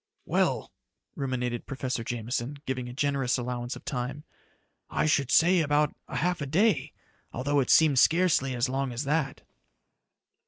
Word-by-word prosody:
"Well," - - 0 0.4
ruminated 125 -3 -3
Professor 130 -3 -3
Jameson, 120 +5 -4
giving 125 -2 -3
a - - -8
generous 135 -2 0
allowance 125 0 -4
of - - -12
time. 130 +4 -4 0.7
"I - - 0
should 140 -3 +2
say 175 +7 +5
about 150 -1 +1
a - - -7
half 175 +5 0
a 140 - -3
day, 195 +9 +2 0.4
although 145 +3 0
it 130 - 0
seemed 150 -5 +5
scarcely 160 -6 +3
as 120 +2 +1
long 135 0 -2
as 120 +4 -3
that." 150 0 -1
135 Hz, 150 wpm, -28 LUFS, 125-150 Hz, 0.7 s, say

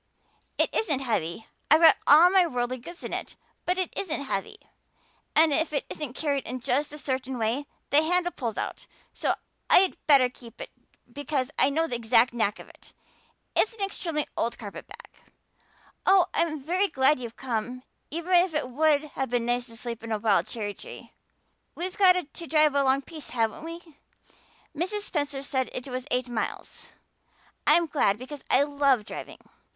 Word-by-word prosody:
"It - - +1
isn't 300 -11 +2
heavy. 215 -5 -2 0.2
I've 310 +3 +6
got 325 - +8
all 330 +5 +8
my 375 -2 +5
worldly 250 -3 -2
goods 345 +8 -11
in - - -5
it, - - -5 0.3
but 360 +1 +1
it 370 -2 -2
isn't 320 -6 -2
heavy. 195 -8 -4 0.8
And 315 -1 +5
if 320 +1 +1
it 285 - -1
isn't 295 -5 -5
carried 285 -4 -1
in 255 +2 -4
just 280 +5 0
a 300 - -8
certain 260 -2 -3
way 235 +6 -1 0.2
the 290 - +6
handle 350 +2 +1
pulls 230 -8 -4
out - - -5 0.3
so - - 0 0.3
I'd 375 0 +6
better 275 -4 +6
keep 240 -2 -14
it - - -8 0.4
because 285 -2 -2
I - - +5
know 320 +4 +1
the 245 -7 -3
exact 235 +1 +3
knack 220 -3 0
of - - -12
it. - - -18 0.6
It's 440 - +3
an 430 - -11
extremely 335 -6 -2
old 235 +1 -1
carpet 205 -4 -9
bag. - - -13 1.0
Oh, 380 -2 +6
I'm 320 -2 0
very 365 +6 +2
glad 270 -2 +3
you've 235 -2 -8
come, 245 0 -4 0.3
even 335 +4 -3
if 350 -2 +4
it 300 -4 -1
would 300 +2 +3
have 270 -3 -4
been 240 -1 0
nice 245 +1 0
to 230 -1 -13
sleep 235 -1 -6
in 230 - -6
a 215 - +1
wild 210 -2 +2
cherry 210 -3 -4
tree. - - -11 0.6
We've 365 +2 -4
got 375 -2 +6
to 340 -1 -5
drive 305 -1 +4
a 280 0 +2
long 270 +1 +2
piece, 310 -1 -7
haven't 225 +2 -1
we? 335 +1 -7 0.9
Mrs. 375 +7 -2
Spencer 290 -7 -2
said 260 -2 -1
it 255 - -4
was 255 0 -5
eight 250 0 0
miles. 240 -2 -5 0.8
I'm 335 +3 +6
glad 275 -10 +1
because 260 +4 -9
I 270 - +5
love 280 -6 +2
driving. - - -8
280 Hz, 180 wpm, -27 LUFS, 245-325 Hz, 1.0 s, got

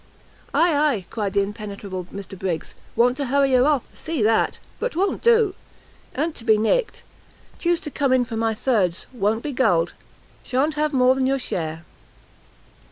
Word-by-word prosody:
"Ay, 335 0 +3
ay," 285 -10 +1
cried 205 -4 -2
the 200 -1 +3
impenetrable 200 -3 -6
Mr 195 +1 -9
Briggs; 180 -4 -3 0.2
"want 245 +1 +3
to 280 -2 -2
hurry 275 +1 +2
her 255 +2 +5
off! 290 -5 +2
see 315 -8 -3
that! 220 +1 +2 0.2
But - - -2
't - - -8
won't 390 +2 0
do; 460 -4 +4 0.6
a'n't 315 +3 -1
to - - -9
be 220 -2 +4
nicked; 225 - 0 0.6
chuse 345 -1 +1
to 300 - -6
come 275 -1 0
in 255 -1 +3
for 235 -2 -6
my 225 0 0
thirds; 205 -8 0
won't 220 0 0
be 295 - -3
gulled, 175 -10 +2 0.5
sha'n't 275 +5 0
have 300 0 0
more 255 -2 +4
than 260 0 0
your 270 +1 +2
share." 165 -9 -4
250 Hz, 175 wpm, -23 LUFS, 205-290 Hz, 0.6 s, her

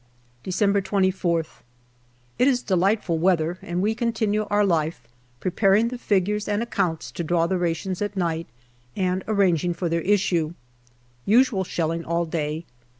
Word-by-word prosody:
December 200 - +1
24>th. 185 -4 0 0.8
It 250 - +5
is 250 -3 +2
delightful 190 -2 +1
weather 175 0 +1
and 175 +2 -2
we 215 +2 +2
continue 220 -3 0
our 205 0 +3
life, 160 -8 -1 0.3
preparing 195 +4 +2
the 250 - -5
figures 210 0 0
and 210 +2 0
accounts 180 -8 -2
to 170 - -4
draw 165 +1 +1
the 185 +1 0
rations 175 +2 -2
at 205 -1 -3
night, 165 -2 -1 0.5
and 185 0 0
arranging 180 -5 +2
for 175 -1 -2
their 170 0 0
issue. 175 -4 +1 0.7
Usual 225 -3 +4
shelling 165 -2 -2
all 170 +1 -1
day. 160 0 -3
185 Hz, 145 wpm, -24 LUFS, 170-205 Hz, 0.8 s, It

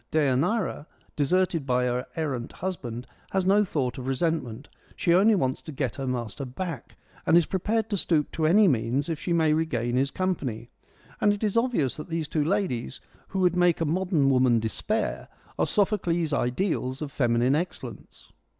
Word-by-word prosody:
Deianira, 155 - +1 0.3
deserted 165 +2 +1
by 125 0 +2
her 125 0 -1
errant 135 -7 -3
husband, 125 -10 -5 0.2
has 190 -1 0
no 200 +2 +5
thought 135 -10 -2
of 130 - -6
resentment: 135 -3 -1 0.3
she 170 - +2
only 205 +5 +5
wants 130 -8 0
to 155 - -9
get 130 -4 -3
her 135 -1 -3
master 125 +2 -3
back, 140 +2 -6 0.3
and 165 - +6
is 170 - +4
prepared 215 +4 -1
to - - +1
stoop 160 -5 +1
to 160 -1 0
any 200 +5 +6
means 130 +1 0
if 160 -2 -2
she 175 - -4
may 160 -2 +3
regain 125 -7 0
his 135 +1 +2
company. 135 -11 -3 0.5
And 205 - +5
it 205 - -6
is 210 -1 0
obvious 230 - +1
that 150 - -8
these 165 -2 -2
two 150 0 0
ladies, 160 - -1 0.3
who 190 - -2
would 180 -1 +3
make 175 -1 +3
a 165 - +1
modern 165 -3 +2
woman 125 -3 +4
despair, 210 - -2 0.3
are - - +2
Sophocles' 175 -6 +1
ideals 130 0 -1
of 145 - -6
feminine 120 0 +2
excellence. 170 +5 -5
155 Hz, 175 wpm, -26 LUFS, 130-185 Hz, 0.5 s, and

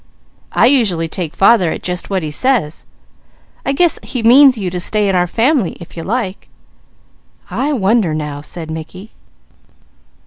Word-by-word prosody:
"I - - +3
usually 215 -11 +2
take 160 -1 -5
father 195 -4 +4
at - - -6
just 180 0 -4
what 190 -3 -1
he 155 - -4
says. 190 - 0 0.8
I - - -1
guess 340 +4 +2
he 245 -3 -5
means 260 +2 +6
you 190 -4 -3
to 180 - -3
stay 210 +3 +1
in 195 - +1
our 180 0 +2
family, 235 - 0
if 170 - -12
you 165 - -6
like." 200 0 -4 1.0
"I 285 +3 -1
wonder 205 - +1
now!" 150 -2 -5
said 160 +1 -6
Mickey. 170 +6 -9
195 Hz, 160 wpm, -16 LUFS, 165-240 Hz, 1.0 s, means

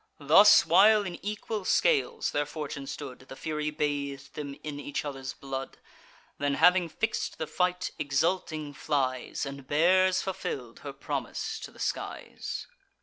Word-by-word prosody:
Thus, 160 +9 +7
while 205 +5 +6
in 175 -2 -7
equal 210 0 -3
scales 460 - +2
their 145 0 0
fortune 150 -2 -6
stood 135 -3 -7
The 130 0 -11
Fury 150 +1 -2
bath'd 140 -2 -3
them 140 -2 -6
in 150 -1 -5
each 145 +1 -4
other's 135 -2 -5
blood; 135 -1 -6 0.6
Then, 145 0 +1
having 180 +1 +5
fix'd 220 +7 -2
the 160 - -2
fight, 180 +2 0
exulting 150 +1 0
flies, 130 -3 -1
And 140 -1 -8
bears 185 +5 +4
fulfill'd 135 - -5
her - - -6
promise - - -4
to - - -8
the - - -19
skies. - - -4
150 Hz, 145 wpm, -29 LUFS, 140-180 Hz, 0.6 s, Thus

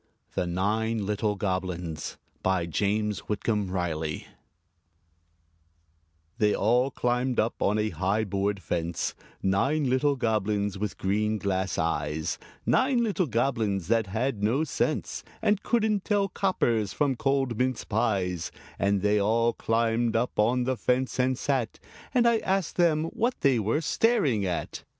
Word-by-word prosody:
THE 90 - -1
NINE 105 +4 0
LITTLE 105 +1 0
GOBLINS 90 -5 -3 0.2
BY 95 -2 +1
JAMES 105 +5 0
WHITCOMB 105 -1 0
RILEY 80 -4 -2 2.1
They 105 -2 +3
all 125 +5 +3
climbed 125 0 0
up 110 - 0
on 105 +2 +2
a 110 0 +1
high 100 +4 0
board 100 -1 -1
fence 85 0 -2 0.3
Nine 135 +10 +2
little 140 +2 +2
Goblins, 105 -4 0
with 105 -1 -3
green 105 +3 0
glass 95 -1 -1
eyes 80 -1 -1 0.3
Nine 255 -2 +3
little 200 -6 0
Goblins 110 -7 0
that 115 -2 +2
had 110 +2 -1
no 120 +9 +2
sense, 145 - -2 0.2
And 205 -1 +2
couldn't 215 -4 +1
tell 205 -2 +1
coppers 115 - 0
from 145 -3 +1
cold 135 -1 0
mince 130 -1 0
pies; 90 -6 -1 0.3
And 100 -1 +1
they 105 0 +3
all 115 +3 +2
climbed 115 0 +1
up 120 0 0
on 125 +4 +3
the 130 0 -1
fence, 130 +2 0
and 130 0 +2
sat 130 -5 -1 0.3
And 240 -2 +3
I 230 -1 +4
asked 190 -4 -1
them 160 -3 +3
what 240 +3 -1
they 135 -4 +4
were 110 +9 0
staring 155 - +2
at. 90 - -4
110 Hz, 140 wpm, -27 LUFS, 100-130 Hz, 2.1 s, I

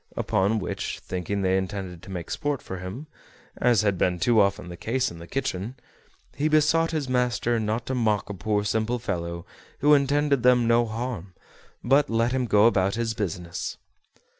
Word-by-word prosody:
Upon 100 +4 +1
which, 95 - -3
thinking 95 +2 -3
they 95 0 +2
intended 95 -2 -4
to 95 - -12
make 90 -3 -6
sport 145 -4 -2
of 95 - -5
him, 95 +11 -7 0.5
as 120 -3 +3
had 100 -4 +1
been 90 -1 +2
too 110 +5 +4
often 100 -1 0
the 90 - -7
case 120 +8 -1
in 85 - -10
the 85 - -10
kitchen, 125 -3 -3 0.6
he 150 - +1
besought 155 +2 +3
his 155 -4 -2
master 125 -2 +1
not 110 +2 -2
to 130 - -3
mock 110 -5 +1
a 100 - -5
poor 105 +2 -1
simple 110 +4 0
fellow, 85 -7 -4 0.3
who 150 +1 +4
intended 140 -1 +3
them 125 -1 +4
no 115 0 +3
harm, 110 -5 -5 0.5
but 140 +3 +3
let 115 +1 +1
him 130 -1 0
go 105 0 +5
about 100 -3 +3
his 115 -1 -1
business. 90 -5 -4
110 Hz, 180 wpm, -25 LUFS, 95-125 Hz, 0.6 s, go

